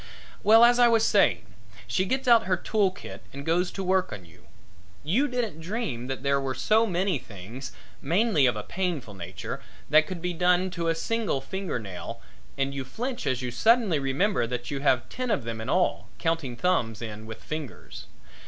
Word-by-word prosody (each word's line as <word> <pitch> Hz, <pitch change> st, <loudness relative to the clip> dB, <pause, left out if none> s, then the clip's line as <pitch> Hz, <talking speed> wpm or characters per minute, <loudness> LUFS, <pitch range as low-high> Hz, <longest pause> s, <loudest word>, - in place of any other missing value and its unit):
Well, 225 Hz, +2 st, +7 dB
as 245 Hz, +1 st, +4 dB
I 240 Hz, -, +7 dB
was 225 Hz, -1 st, +4 dB
saying, 100 Hz, -, +3 dB, 0.4 s
she 115 Hz, -, 0 dB
gets 260 Hz, +6 st, -1 dB
out 230 Hz, -2 st, +6 dB
her 185 Hz, -1 st, +2 dB
tool 205 Hz, +1 st, +1 dB
kit 185 Hz, -, -10 dB
and 140 Hz, +1 st, -8 dB
goes 175 Hz, +3 st, +2 dB
to 195 Hz, -, -4 dB
work 185 Hz, 0 st, +1 dB
on 95 Hz, -4 st, -8 dB
you. 85 Hz, -, -20 dB, 0.6 s
You 215 Hz, -, +2 dB
didn't 240 Hz, -, -3 dB
dream 165 Hz, -, -3 dB
that 135 Hz, 0 st, -4 dB
there 140 Hz, 0 st, +2 dB
were 135 Hz, -1 st, -2 dB
so 220 Hz, -, +3 dB
many 185 Hz, -4 st, 0 dB
things 110 Hz, +6 st, -9 dB, 0.3 s
mainly 170 Hz, -, +3 dB
of 120 Hz, -, +1 dB
a 105 Hz, -, -4 dB
painful 170 Hz, -, -3 dB
nature 90 Hz, 0 st, -6 dB, 0.3 s
that 155 Hz, +1 st, +6 dB
could 185 Hz, -2 st, -5 dB
be 180 Hz, +1 st, -2 dB
done 180 Hz, +2 st, +2 dB
to 170 Hz, -2 st, -3 dB
a 165 Hz, -, +2 dB
single 225 Hz, -4 st, -1 dB
finger 185 Hz, +4 st, -4 dB
nail 100 Hz, -6 st, -7 dB, 0.4 s
and 135 Hz, 0 st, 0 dB
you 135 Hz, -1 st, -3 dB
flinch 245 Hz, -, -4 dB
as 130 Hz, -1 st, 0 dB
you 125 Hz, -, -2 dB
suddenly 220 Hz, -, +3 dB
remember 135 Hz, -, +1 dB
that 125 Hz, +1 st, -4 dB
you 140 Hz, -, -2 dB
have 130 Hz, -3 st, +2 dB
ten 255 Hz, 0 st, -4 dB
of 205 Hz, -, +1 dB
them 115 Hz, -1 st, -5 dB
in 110 Hz, -, -5 dB
all, 185 Hz, +4 st, +1 dB
counting 165 Hz, -7 st, -1 dB
thumbs 120 Hz, -, 0 dB
in 110 Hz, -1 st, -7 dB
with 110 Hz, 0 st, -9 dB
fingers. 155 Hz, -3 st, -7 dB
165 Hz, 195 wpm, -27 LUFS, 125-200 Hz, 0.6 s, Well